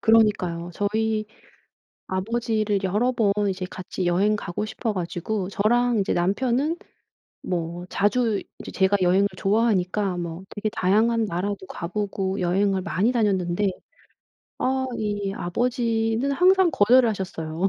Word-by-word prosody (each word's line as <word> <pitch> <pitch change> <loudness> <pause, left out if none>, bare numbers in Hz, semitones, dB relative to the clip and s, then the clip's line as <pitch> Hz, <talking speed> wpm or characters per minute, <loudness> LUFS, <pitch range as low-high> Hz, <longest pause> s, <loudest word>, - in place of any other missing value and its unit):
그러니까요. 190 -7 +2
저희 215 +1 0 0.8
아버지를 215 +1 -1
여러 210 +7 +1
번 210 -5 +2 0.2
이제 185 -1 -3
같이 185 0 -5
여행 195 +5 +3
가고 200 0 -4
싶어 220 0 -3
가지고 185 +2 -3
저랑 235 +3 +2
이제 195 - 0
남편은 250 - +1 0.7
뭐 175 0 -3
자주 210 +1 +1 0.2
이제 - - -8
제가 190 +1 +2
여행을 185 +3 +4
좋아하니까 200 -3 +1
뭐 170 +1 -5
되게 210 +1 -3
다양한 220 +4 +2
나라도 195 +1 -3
가 170 - -6
보고 195 -1 -2
여행을 190 +2 +1
많이 205 +5 +1
다녔는데 200 -4 +1 0.9
아 260 0 0
이 205 -2 -2
아버지는 230 +5 0
항상 370 +2 +4
거절을 240 +4 +5
하셨어요. 185 -3 -2
205 Hz, 290 characters per minute, -24 LUFS, 185-225 Hz, 0.9 s, 거절을